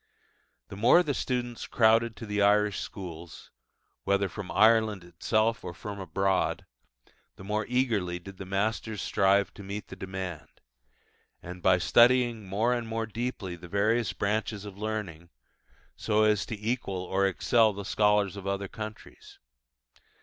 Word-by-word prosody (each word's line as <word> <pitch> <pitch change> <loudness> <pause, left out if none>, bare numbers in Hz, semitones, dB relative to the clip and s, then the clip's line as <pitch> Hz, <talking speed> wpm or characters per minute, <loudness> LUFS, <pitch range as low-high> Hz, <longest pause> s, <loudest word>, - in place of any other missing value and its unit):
The - - -8
more 120 - +5
the 145 - -1
students 120 -3 -3
crowded 115 0 +3
to 115 - -8
the 105 -1 -1
Irish 105 0 +3
schools, 85 -4 -9 0.5
whether 100 0 +1
from 95 +1 -7
Ireland 110 -3 +3
itself 110 +7 0
or 90 -1 -6
from 105 -1 -7
abroad, 95 +1 0 0.7
the - - -12
more 105 +1 -2
eagerly 110 -9 0
did 95 +2 -11
the 95 - -7
masters 105 +2 -2
strive 100 +1 +2
to - - -11
meet 100 0 -6
the - - -8
demand, 95 -4 -7 1.0
by 90 +1 +4
studying 120 +2 +4
more 110 +6 +1
and 120 -2 -3
more 115 0 -2
deeply 110 -4 -4
the 85 +1 -12
various 105 +5 +1
branches 105 0 -2
of 100 -2 -8
learning, 100 -6 -5 0.7
so 110 -1 +1
as 105 -1 +2
to 110 -3 -5
equal 105 -4 -2
or 95 +2 +1
excel 110 +4 +3
the 100 -1 -7
scholars 105 -2 +2
of 100 -1 -7
other 100 0 -2
countries. 110 +2 -10
105 Hz, 145 wpm, -28 LUFS, 95-110 Hz, 1.0 s, more